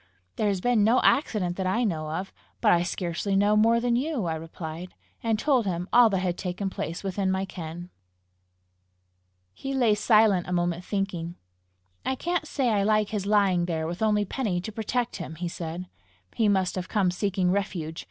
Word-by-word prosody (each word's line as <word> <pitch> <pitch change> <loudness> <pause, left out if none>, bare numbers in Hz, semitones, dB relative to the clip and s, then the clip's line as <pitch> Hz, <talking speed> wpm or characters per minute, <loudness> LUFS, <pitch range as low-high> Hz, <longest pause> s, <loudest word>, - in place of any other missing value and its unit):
"There 215 - 0
has 195 -3 0
been 240 -2 +3
no 230 +4 +4
accident 205 - +2
that 190 -1 -1
I 225 +7 +1
know 160 -8 -1
of. 180 +5 -4 0.3
But - - +4
I 170 - +4
scarcely 175 +2 -2
know 205 +2 +4
more 225 +2 +4
than 240 0 +1
you," 265 - -1
I 165 - -1
replied 160 +2 -7 0.3
and 225 -2 +1
told 255 -3 +2
him 175 -1 -2
all 240 -1 +7
that 195 - 0
had 180 -1 -1
taken 190 +1 -3
place 165 +1 -5
within 195 0 -1
my 190 +1 0
ken. 175 0 -8 1.6
He 270 - -5
lay 240 -5 +4
silent 210 -3 +4
a 180 - -2
moment, 175 0 0
thinking. 180 -4 -3 0.7
"I 265 - -1
can't 345 +2 -2
say 265 -5 0
I 210 -3 +2
like 215 0 +2
his 205 -2 -3
lying 195 -4 +3
there 160 -2 -2
with 175 +4 -5
only 210 -1 +2
Penny 205 -5 -2
to 220 - -6
protect 235 +3 -2
him!" 160 -3 -7
he 175 +2 -4
said. 170 +1 -5 0.5
"He 220 - +2
must 190 -2 +1
have 185 -1 -5
come 195 -5 +2
seeking 185 -1 0
refuge! 175 -5 -2
195 Hz, 190 wpm, -26 LUFS, 175-220 Hz, 1.6 s, all